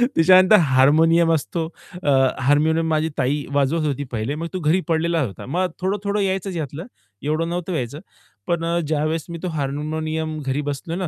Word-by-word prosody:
त्याच्यानंतर 185 Hz, +4 st, +6 dB
हार्मोनियम 160 Hz, +3 st, +4 dB
असतो. 160 Hz, +2 st, -2 dB, 0.4 s
अ, -, -, +1 dB, 0.3 s
हार्मोनियम 155 Hz, +4 st, +2 dB
माझी 155 Hz, 0 st, +1 dB
ताई 140 Hz, +2 st, 0 dB
वाजवत 145 Hz, +3 st, +1 dB
होती 145 Hz, -1 st, -1 dB
पहिले 120 Hz, +5 st, -2 dB
मग 165 Hz, +2 st, -4 dB
तो 185 Hz, -, -2 dB
घरी 165 Hz, +3 st, +2 dB
पडलेला 165 Hz, 0 st, +1 dB
होता. 110 Hz, -8 st, -5 dB
मग 180 Hz, +6 st, -1 dB
थोडं-थोडं 200 Hz, +2 st, -1 dB
यायचंच 190 Hz, -1 st, -2 dB
यातलं, 155 Hz, +2 st, -5 dB, 0.4 s
एवढं 155 Hz, +3 st, -1 dB
नव्हतं 180 Hz, +1 st, -3 dB
यायचं. 135 Hz, 0 st, -3 dB, 0.5 s
पण 170 Hz, -1 st, 0 dB
अ, 170 Hz, +1 st, 0 dB
ज्यावेळेस 155 Hz, +1 st, -1 dB
मी 170 Hz, -, -5 dB
तो 185 Hz, -, -1 dB
हार्मोनियम 155 Hz, +2 st, -3 dB
घरी 135 Hz, +1 st, -2 dB
बसलो 155 Hz, +4 st, -5 dB
ना 185 Hz, 0 st, -2 dB
160 Hz, 170 wpm, -21 LUFS, 145-170 Hz, 0.5 s, त्याच्यानंतर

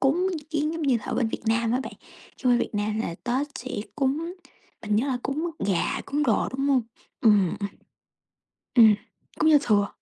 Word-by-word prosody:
cúng 310 Hz, +7 st, +2 dB, 0.2 s
kiếng 305 Hz, 0 st, 0 dB
giống 330 Hz, 0 st, -4 dB
như 270 Hz, -4 st, +3 dB
là 215 Hz, -, -8 dB
ở -, -, -2 dB
bên 230 Hz, -, +1 dB
Việt -, -, -5 dB
Nam 225 Hz, 0 st, +2 dB
á 255 Hz, -, +1 dB
bạn, -, -, -7 dB, 0.4 s
chứ 255 Hz, -, -1 dB
qua 245 Hz, -, +5 dB
Việt 240 Hz, -, -2 dB
Nam 210 Hz, +1 st, -1 dB
là 170 Hz, -, -3 dB
Tết 255 Hz, +4 st, 0 dB
sẽ 255 Hz, +2 st, -7 dB, 0.3 s
cúng, 300 Hz, +5 st, -1 dB, 0.5 s
mình 210 Hz, -1 st, 0 dB
nhớ 240 Hz, +6 st, +1 dB
là 255 Hz, -3 st, -1 dB
cúng 310 Hz, +6 st, -2 dB, 0.2 s
gà, 190 Hz, -4 st, 0 dB
cúng 290 Hz, +1 st, 0 dB
đồ, 235 Hz, -8 st, +2 dB
đúng 275 Hz, -, 0 dB
hông? 265 Hz, -3 st, +3 dB, 0.4 s
Ừm, 205 Hz, -6 st, +5 dB
ừm. 200 Hz, -, -2 dB, 1.1 s
Ừm. 220 Hz, -4 st, +8 dB, 0.4 s
Cúng 315 Hz, -, +4 dB
Giao 295 Hz, -, +7 dB
thừa. 205 Hz, -2 st, +3 dB
250 Hz, 205 wpm, -25 LUFS, 215-290 Hz, 1.1 s, Ừm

